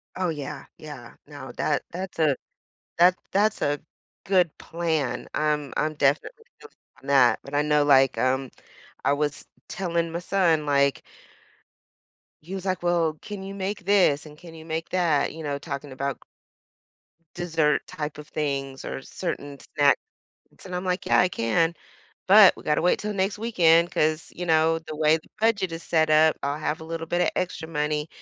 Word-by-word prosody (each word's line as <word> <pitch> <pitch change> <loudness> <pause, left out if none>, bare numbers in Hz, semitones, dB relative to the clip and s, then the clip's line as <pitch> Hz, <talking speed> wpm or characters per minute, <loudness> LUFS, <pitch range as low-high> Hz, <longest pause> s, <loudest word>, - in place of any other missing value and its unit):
Oh, 185 -1 -1
yeah, 150 -4 -6
yeah, - - -10
no. - - -10
That - - -1
that's 180 0 -6
a 150 -4 +3 0.6
that 180 +2 +6 0.2
that's 210 +2 +2
a 145 0 0 0.5
good 180 -4 +2
plan. 160 -7 -2
I'm 150 -3 -1
I'm 155 0 0
definitely 150 - 0
feel 440 - -14
you - - -35 0.3
on 135 - -13
that, 125 -5 +4
but 140 - -9
I 145 - +3
know, 150 -1 +2
like, 135 -2 +5
um, 130 0 0 0.5
I 140 - +3
was 145 0 -2 0.2
telling 170 -3 -2
my 170 - -3
son, 175 -4 +1
like 140 -1 +2 1.4
he 180 +5 -7
was 190 -1 -6
like, 185 -2 -1
“Well, 170 -3 +1
can 205 -2 -7
you 195 +1 -7
make 200 0 -4
this 185 -8 +3
and 150 0 -13
can 170 -1 -13
you 160 0 -11
make 165 0 -4
that?” 170 -6 +1
You 160 - -8
know, 145 -1 -2
talking 140 0 -6
about 140 +1 -3 1.2
dessert 165 -4 +1
type 150 -1 -5
of 150 0 -10
things 135 -3 -3
or - - -5
certain 145 -2 -5 0.2
snacks. 145 -1 +5 0.7
And 185 -1 -7
I'm 180 - -3
like, 180 0 -2
“Yeah, - - +4
I 180 - +3
can. 165 +4 +1 0.5
But 200 0 +8
we - - -12
gotta 150 +1 +1
wait 180 - +3
till 210 0 -3
next 195 +1 -1
weekend 175 -7 +3
‘cause, 155 +1 0
you 180 - -5
know, 160 0 +3
the 155 -1 -8
way 155 +1 +4
the 160 - -13
budget 210 -5 +1
is 165 +1 -6
set 160 -2 +1
up, 155 +1 +5
I'll 140 +1 -2
have 155 0 -2
a - - -8
little 165 0 -5
bit 175 +2 0
of - - +2
extra 170 -3 -3
money 150 -1 -1
160 Hz, 180 wpm, -25 LUFS, 145-180 Hz, 1.4 s, But